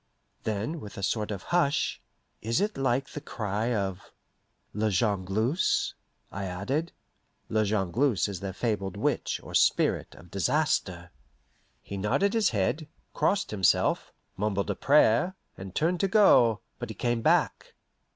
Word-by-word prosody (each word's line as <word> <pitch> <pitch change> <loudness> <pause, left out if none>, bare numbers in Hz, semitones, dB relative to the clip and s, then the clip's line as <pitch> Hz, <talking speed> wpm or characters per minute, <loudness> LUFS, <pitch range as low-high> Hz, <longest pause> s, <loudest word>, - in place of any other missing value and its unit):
Then, 110 +9 -2
with 105 -7 -10
a 100 - -5
sort 105 +1 -1
of 100 -3 -5
hush, 160 -5 +1 0.4
"Is't 185 - 0
like 135 +1 0
the 150 - -7
cry 110 -3 -2
of 100 -4 -2 0.7
La 110 +1 0
Jongleuse?" 105 - +1 0.4
I 100 0 -4
added. 115 - -2 0.6
(La 110 0 +2
Jongleuse 105 +4 +1
is 100 -3 -5
their 95 0 -4
fabled 100 -2 -2
witch, - - -1
or - - -10
spirit, - - +2
of 90 0 -16
disaster.) 95 - 0 0.7
He 100 - -6
nodded 105 - +1
his 225 -3 +3
head, 115 - -1 0.3
crossed 200 0 +1
himself, 95 -5 +2 0.3
mumbled 100 0 -1
a - - -3
prayer, 150 - +3 0.2
and 95 0 -9
turned 170 +3 +1
to 195 - +2
go, 125 - +5 0.2
but 110 -3 -6
came 120 -1 0
back. - - +1
110 Hz, 135 wpm, -28 LUFS, 100-145 Hz, 0.7 s, go